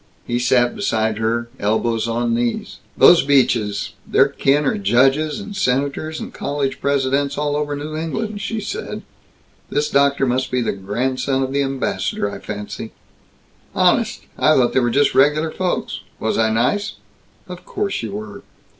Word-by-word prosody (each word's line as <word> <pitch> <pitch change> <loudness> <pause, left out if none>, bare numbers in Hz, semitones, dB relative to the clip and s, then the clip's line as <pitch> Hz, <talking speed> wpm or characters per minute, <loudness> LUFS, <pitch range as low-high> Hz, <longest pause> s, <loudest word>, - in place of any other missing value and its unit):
He 120 0 -1
sat 120 -1 +2
beside 110 - 0
her, 115 +1 0
elbows 110 +2 0
on 115 0 0
knees. 120 0 -2 0.2
"Those 175 - +8
Beaches 120 -7 +1
their - - +4
kin 145 +2 +1
are 135 - 0
judges 135 - +2
and 205 0 -8
senators 145 0 -1
and - - -7
college 140 -2 -3
Presidents, 140 0 +1
all 145 0 0
over 145 -1 -1
New 150 +2 -5
England," 205 +7 -3
she 225 +1 -3
said. 445 - -5 0.7
"This 150 +1 -1
doctor 140 0 +3
must 130 +1 0
be 125 - 0
the - - 0
grandson 130 +7 -1
of 130 0 -3
the 140 - +2
ambassador, 135 -6 -1
I - - -7
fancy." 105 -1 -7 0.8
"Honest? - - +2 0.2
I 155 - +5
thought 125 -2 +3
they - - +4
were 120 -1 +1
just 145 +4 +2
regular 150 +3 +3
folks. 185 +1 -2 0.2
Was 110 - -1
I 110 0 +2
nice?" 125 - 0 0.5
"Of 180 0 -9
course 200 -1 -3
you 110 -3 -5
were." 105 0 -7
135 Hz, 160 wpm, -20 LUFS, 115-150 Hz, 0.8 s, Those